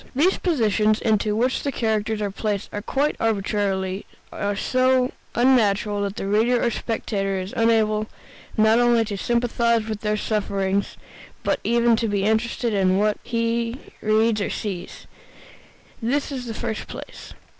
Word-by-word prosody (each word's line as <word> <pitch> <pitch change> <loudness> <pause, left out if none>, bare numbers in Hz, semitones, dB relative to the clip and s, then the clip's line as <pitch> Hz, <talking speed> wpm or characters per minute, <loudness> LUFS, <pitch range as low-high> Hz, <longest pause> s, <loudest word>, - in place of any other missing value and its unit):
These 340 +8 +3
positions, 215 - +2
into 215 -2 +1
which 250 +4 +1
the 280 - -2
characters 220 -3 -1
are 200 - -2
placed 205 0 -3 0.2
quite 285 +2 +1
arbitrarily, 195 -3 -1 0.3
are 205 0 -2
so 255 +3 +2 0.2
unnatural 210 -5 +3
that 200 0 -2
the - - -4
reader 225 +5 +2
or 235 - +1
spectator 200 -4 -2
is 185 +2 -6
unable 215 -2 +2 0.5
not 220 +2 +5
only 240 -2 +4
to 205 -1 -4
sympathize 235 +1 +1
with 215 -2 -4
their 210 0 0
sufferings 200 -2 -1 0.5
but - - +1
even 235 0 +3
to 230 - 0
be 200 -2 0
interested 220 +2 0
in 190 -2 +2
what 210 +1 +2
he 230 +1 -1 0.2
reads 215 0 +2
or - - -1
sees. 190 -4 -5 1.0
This 275 +6 0
in 255 -3 -5
the 225 - -5
first 220 - -4
place. - - -9
220 Hz, 145 wpm, -23 LUFS, 205-235 Hz, 1.0 s, not